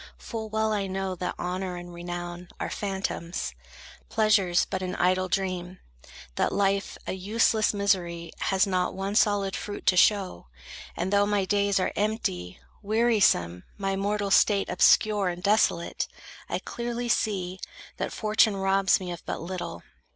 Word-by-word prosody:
Full 220 -1 -6
well 220 0 0
I 200 -2 -1
know 190 0 -2
that 180 - -3
honor 180 +1 -3
and 175 0 -9
renown 175 0 -6
Are - - -3
phantoms; 190 -3 -3 0.6
pleasures 215 -5 +3
but 190 -1 -3
an 185 0 -3
idle 185 +1 +2
dream; 185 -1 -2 0.6
That - - +1
life, 200 0 0
a - - -3
useless 215 +3 +2
misery, 175 -5 -1
has 190 +1 +2
not 185 -2 0
One 195 +1 -3
solid 205 -3 +2
fruit 205 -1 -6
to 185 - +4
show; 185 - +2 0.5
and 190 - -1
though 200 0 +4
my 205 -2 +1
days 200 0 +2
Are 185 - -1
empty, 95 - -2 0.2
wearisome, 205 - +2
my 195 -1 -1
mortal 200 0 -1
state 200 0 +4
Obscure 205 +2 +4
and 175 0 -6
desolate, 200 -4 +1 0.4
I - - 0
clearly 240 0 -4
see 190 -5 0 0.4
That - - -3
Fortune 215 -1 +2
robs 195 0 +3
me 180 -2 -4
but - - -1
of - - -9
little. 170 - -6
195 Hz, 150 wpm, -27 LUFS, 180-205 Hz, 0.6 s, to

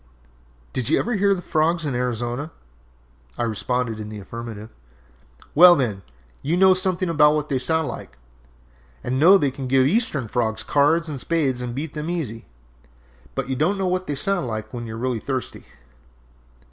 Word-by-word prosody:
"Did 125 -3 -1
you - - +4
ever 240 - -1
hear 200 -1 +3
the 180 - -7
frogs 165 +1 +1
in 140 - -2
Arizona?" 125 +3 -2 0.9
I - - -1
responded 115 0 -2
in 105 0 -6
the 105 - -7
affirmative. 110 +1 -8 0.8
"Well, 175 +3 +9
then, 110 - -1 0.4
you 160 +5 0
know 190 0 +6
something 185 0 0
about 150 -2 +4
what 150 0 -2
they 135 -3 0
sound 160 +4 0
like, - - -8 0.9
and 130 +2 -1
know 185 +6 +8
they 145 -7 0
can 135 0 -6
give 130 0 +4
Eastern 150 - +1
frogs 110 -2 -1
cards 150 +7 +2
and 145 -3 -5
spades 135 -5 0
and 120 -1 -4
beat 145 +2 -4
them 150 +1 -4
easy. 135 -11 -4 0.9
But - - -2
you 130 - -2
don't 165 +9 +1
know 190 - -1
what 185 0 -1
they 145 - -2
sound 175 +1 -1
like 110 0 -5
when 120 -1 -5
you 110 - -6
are - - -7
really 125 -1 -1
thirsty!" 130 +2 -5
140 Hz, 180 wpm, -23 LUFS, 120-165 Hz, 0.9 s, Well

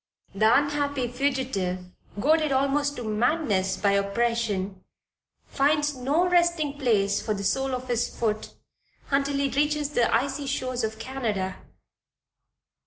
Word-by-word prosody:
The 215 +3 +4
unhappy 285 -2 0
fugitive 245 -9 -1 0.3
goaded 310 +4 +3
almost 280 +2 +1
to 245 - -6
madness 215 - 0
by 200 -1 +2
oppression 200 -2 -1 0.6
finds 295 +1 +1
no 285 +8 +1
resting 340 -5 +2
place 205 -6 +2
for 215 - -2
the 200 - -5
sole 265 +6 0
of 255 0 -7
his 240 -1 0
foot 215 -2 -3 0.6
until 280 0 +1
he 280 0 +1
reaches 295 +1 0
the 245 -5 +2
icy 275 +4 0
shores 255 -2 -2
of 220 0 -2
Canada. 220 -6 -3
255 Hz, 125 wpm, -26 LUFS, 215-285 Hz, 0.6 s, The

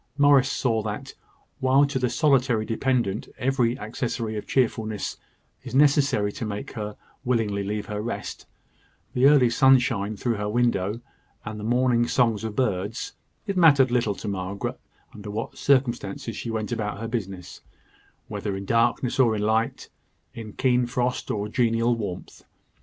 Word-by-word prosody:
Morris 145 -2 +5
saw 115 -4 0
that, 105 0 -5 0.5
while 135 +2 +4
to 140 -2 -2
the 125 -1 +1
solitary 125 -7 +2
dependant 115 -2 -1
every 125 -2 +1
accessory 110 +1 -3
of 105 - -5
cheerfulness 110 -4 -1 0.5
is 130 -1 -6
necessary 140 -7 +3
to 115 - -6
make 105 +5 -5
her 105 -3 -6 0.3
willingly 110 -6 0
leave 105 +1 -3
her 105 -1 -4
rest 115 - -5 0.7
the 130 +2 +5
early 140 -4 +6
sunshine 120 -4 +3
through 120 +3 0
her 105 0 -2
window, 110 -3 +1 0.5
and 105 0 -6
the - - -7
morning 120 +1 +2
songs 115 -5 +1
of 110 -2 -4
birds 105 -3 -2 0.3
it 200 -2 -2
mattered 140 -8 +5
little 115 -5 +1
to 105 - -7
Margaret 100 0 -4 0.3
under 105 0 -9
what 110 +2 -4
circumstances 120 -5 0
she 120 - -5
went 110 0 -3
about 105 -3 -3
her 115 - -4
business 95 -6 -5 0.7
whether 100 -1 -4
in 100 - -6
darkness 120 +4 +1
or 115 -4 +4
in 105 - -2
light, 110 +2 0 0.5
in 110 -3 -8
keen 125 -2 +2
frost 125 +1 -2
or 105 -1 -2
genial 115 +1 +1
warmth. 100 -6 -6
115 Hz, 150 wpm, -25 LUFS, 105-125 Hz, 0.7 s, early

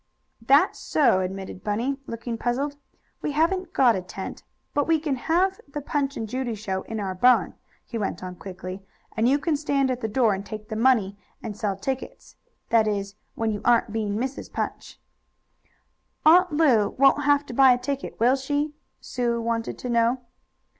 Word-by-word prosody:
"That's 280 +10 +4
so," 245 -10 +3
admitted 190 0 -5
Bunny, 235 +7 -1
looking 230 +1 -4
puzzled, 260 +5 -1 0.5
"We 295 - -2
haven't 365 +5 +1
got 245 -4 +4
a 185 - -2
tent. 190 +1 -7 0.3
But 290 - +1
we 325 -1 +4
can 295 -3 -1
have 360 +8 +1
the 285 +1 -5
Punch 285 0 -2
and 225 - -3
Judy 250 0 -3
show 190 -2 -3
in 225 +2 -6
our 195 -2 -2
barn," 245 +7 +4 0.3
he 230 - -5
went 195 -4 -3
on 180 0 -6
quickly, 185 0 -7 0.3
"and 225 +2 +3
you 280 - +4
can 300 +2 0
stand 280 -2 +1
at 250 0 -3
the 220 - -1
door 220 -1 +2
and 195 +1 -4
take 215 +1 -8
the 220 - -4
money, 215 -4 +2 0.2
and 215 -3 -5
sell 205 -2 -2
tickets 260 +7 -5 0.3
that 225 -2 +4
is, 200 -1 -2 0.2
when 225 -1 0
you 205 - -4
aren't 235 -2 +3
being 210 -2 -1
Mrs. 260 +4 -4
Punch." - - -5 1.3
"Aunt 360 +3 +6
Lu 275 -9 +3
won't 275 +1 +4
have 290 0 +3
to - - -8
buy 265 +1 +7
a 245 - +4
ticket, 275 +2 -4
will 245 +4 +4
she?" 290 +2 -2 0.3
Sue 240 -2 -1
wanted 230 0 -2
to - - -6
know. 235 +1 +2
240 Hz, 180 wpm, -25 LUFS, 210-280 Hz, 1.3 s, buy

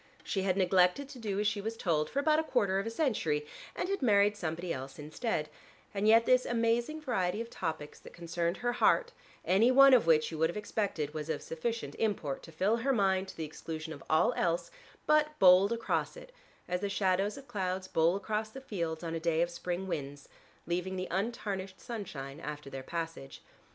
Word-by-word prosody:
She 195 - -1
had 190 -1 0
neglected 185 +7 +3
to 260 - -10
do 205 -3 -2
as 210 - 0
she 210 -1 0
was 225 +2 -4
told 155 -6 0
for - - -7
about 305 +2 +3
a - - +1
quarter 195 -10 +1
of 200 - -3
a - - 0
century, 210 - 0 0.3
and - - -2
had 395 -2 -2
married 205 -4 +4
somebody 170 -2 -3
else 135 +1 -7
instead, 155 +2 -3 0.5
and 205 +1 0
yet 225 +1 +6
this 255 0 +4
amazing 235 +6 0
variety 205 -8 -1
of 230 0 -5
topics 160 -4 -5
that - - -13
concerned 170 +1 -2
her 240 - +3
heart, 470 - +3 0.3
any 205 +6 +4
one 275 +1 +8
of 240 -9 +5
which, 155 -1 +4
you 160 - -6
would 160 0 +3
have 175 - -5
expected, 195 -8 -2
was 155 0 -5
of 155 - -2
sufficient 225 +8 -3
import 185 -11 -1
to 165 - -12
fill 195 +8 +1
her 260 +4 0
mind 195 -5 +2
to - - -10
the 160 - -3
exclusion 160 +1 -6
of - - -11
all 155 - +4
else, 170 - -1 0.3
but 305 0 +3
bowled 185 +2 +7
across 235 - -1
it, - - -12 0.4
as 180 0 -2
the 200 - -1
shadows 195 +3 +1
of 275 0 -11
clouds 185 -4 -2
bowl 165 0 +2
across 215 +2 -2
the 265 - -9
fields 170 -11 -4
on 165 -1 -3
a 165 - -2
day 165 0 +2
of 175 - -3
spring 175 +2 -3
winds, 145 -5 -5 0.4
leaving 180 +2 -2
the 185 0 -3
untarnished 195 -1 -3
sunshine 165 - -6
after 150 -2 -7
their 135 - -5
passage. 165 -2 -6
190 Hz, 205 wpm, -31 LUFS, 165-230 Hz, 0.5 s, one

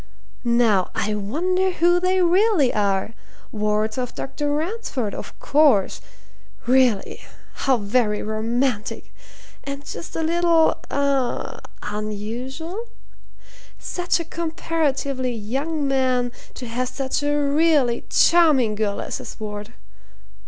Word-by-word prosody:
Now 235 -6 +3
I 210 +1 0
wonder 345 - 0
who 350 +1 +3
they 365 +1 +2
really 360 - +3
are? 200 +1 0 0.4
Wards 215 +2 0
of 250 -1 -4
Dr. 290 +2 -3
Ransford, 300 - -2
of - - -8
course! 280 -10 +3 0.6
Really, 250 -5 +2 0.5
how 265 -2 +5
very 210 0 0
romantic! 220 +1 -2 0.5
and 280 0 -6
just - - -7
a 325 - -1
little 335 0 +3
eh? 280 -2 -1 0.2
unusual? 240 - -5 0.9
Such 355 -1 -1
a 335 - -4
comparatively 300 -6 -1
young 275 +8 -2
man 255 -2 +1 0.2
to 250 - -7
have 245 +2 -2
such 270 0 -2
a 290 0 +1
really 290 -4 +2
charming 305 -10 +4
girl 210 -1 -1
as - - -4
his - - -9
ward! 210 0 -6
265 Hz, 110 wpm, -22 LUFS, 220-320 Hz, 0.9 s, how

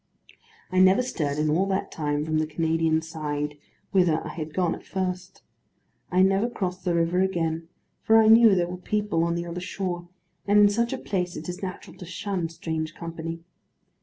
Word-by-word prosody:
I 185 - +2
never 190 +6 +6
stirred 150 - -2
in 150 0 +1
all 185 +5 +2
that 190 0 -1
time 150 -1 -1
from 155 0 0
the 155 - 0
Canadian 160 0 +1
side, 150 -2 -4 0.3
whither 175 -5 +2
I - - -5
had 155 -2 -6
gone 175 0 0
at - - -9
first. 185 -1 -4 0.7
I 185 +1 +4
never 195 +5 +2
crossed 185 -5 -4
the 175 -1 +1
river 170 +2 +2
again; 165 -3 -1 0.3
for 225 - +5
I 220 -1 +6
knew 225 -2 +7
there 175 -1 +1
were 180 +1 -6
people 205 -2 -1
on 170 0 0
the 170 0 -3
other 175 +1 -5
shore, 175 -2 -4 0.4
and 205 +1 +4
in 205 0 +7
such 235 +3 0
a 265 - -2
place 180 -7 -2
it 155 - -7
is 180 0 -5
natural 190 -1 -7
to 180 - -9
shun 185 -1 -3
strange 160 -1 -4
company. 165 0 -6
175 Hz, 190 wpm, -26 LUFS, 160-190 Hz, 0.7 s, knew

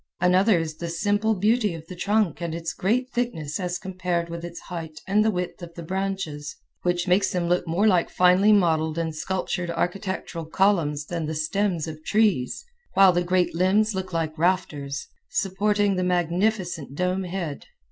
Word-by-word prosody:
Another 185 +3 +4
is 160 -2 -3
the 170 - -4
simple 205 +6 +1
beauty 210 -1 +2
of 160 -1 -9
the 180 - -9
trunk 200 -2 +1
and 170 -1 -3
its 165 0 -4
great 250 +7 0
thickness 165 -12 -2
as 180 -1 -2
compared 180 -2 -2
with 170 0 -6
its 170 0 -7
height 160 -3 -7
and 205 +2 +3
the 220 - +3
width 180 -2 -3
of 170 -1 -9
the 170 - -7
branches, 185 -5 -3 0.3
which 175 0 0
makes 190 +2 +3
them 180 -2 -1
look 175 0 +1
more 175 +6 +1
like 180 -5 +3
finely 180 +3 +5
modeled 160 -5 +3
and 165 -2 -2
sculptured 180 +1 -2
architectural 175 0 -3
columns 160 -5 +1
than 165 -1 -3
the 160 - -3
stems 170 +2 0
of 155 -1 -8
trees, 205 - +1 0.3
while 195 -1 +7
the 175 - +2
great 180 0 +1
limbs 195 +5 +2
look 190 -1 -4
like 165 -2 -2
rafters, 145 -6 -1 0.2
supporting 205 +1 +1
the 185 - 0
magnificent 180 -3 0
dome 180 +3 0
head. 175 -5 -5
180 Hz, 175 wpm, -25 LUFS, 165-195 Hz, 0.3 s, while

